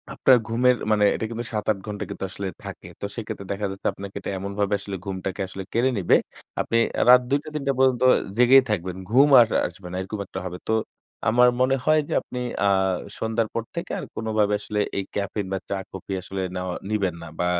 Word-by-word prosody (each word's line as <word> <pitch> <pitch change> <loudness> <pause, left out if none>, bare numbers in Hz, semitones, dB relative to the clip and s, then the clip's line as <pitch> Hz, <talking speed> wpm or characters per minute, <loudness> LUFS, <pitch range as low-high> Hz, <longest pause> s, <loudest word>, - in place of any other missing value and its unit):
আপনার 130 -2 +6
ঘুমের 125 +2 +3 0.2
মানে 105 -1 +3
এটা - - -3
কিন্তু 115 +1 -5
৭ 105 -1 -2
৮ 105 - -2
ঘন্টা 105 -1 -4
কিন্তু - - -6
আসলে 95 +1 -5 0.2
থাকে। - - -8
তো - - -2
সেই 115 - -4
ক্ষেত্রে 105 -3 -6
দেখা 100 +1 -2
যাচ্ছে 95 - -4
আপনাকে 100 0 -9
এটা - - -6
এমনভাবে 100 +1 -2
আসলে 100 0 -6
ঘুমটাকে 95 -1 -4
আসলে 95 +1 -7
কেড়ে 120 +3 +3
নিবে। 95 - +4 0.5
আপনি 115 - 0 0.2
এ - - +3
রাত 125 0 +9
২ 140 - +3
টা, - - -8
৩ 150 - -2
টা 140 - +3
পর্যন্ত 130 -1 +3 0.3
জেগেই 130 +2 +7
থাকবেন। 95 -3 -2
ঘুম 135 +5 +6
আর 115 - +7 0.2
আসবে 90 +1 -12
না - - -5
এরকম 100 +3 -5
একটা 95 - -6
হবে। 90 -1 -5
তো 110 - +1 0.6
আমার 125 +2 +6
মনে 130 +1 +4
হয় 155 0 +5
যে - - -3
আপনি 125 - -7 0.3
আ - - +5 0.5
সন্ধ্যার 110 0 0
পর 115 - -1
থেকে 170 - -4
আর - - -6
কোনোভাবে 110 -2 +1
আসলে 105 - -3 0.2
এই 100 - 0
ক্যাফেইন 100 0 -2
বা - - 0
চা-কফি 95 0 -5
আসলে 95 +1 -5
নেওয়া 90 -1 -3
নিবেন 100 -5 0
না - - -8
বা 90 - +1
105 Hz, 215 wpm, -24 LUFS, 95-120 Hz, 0.6 s, রাত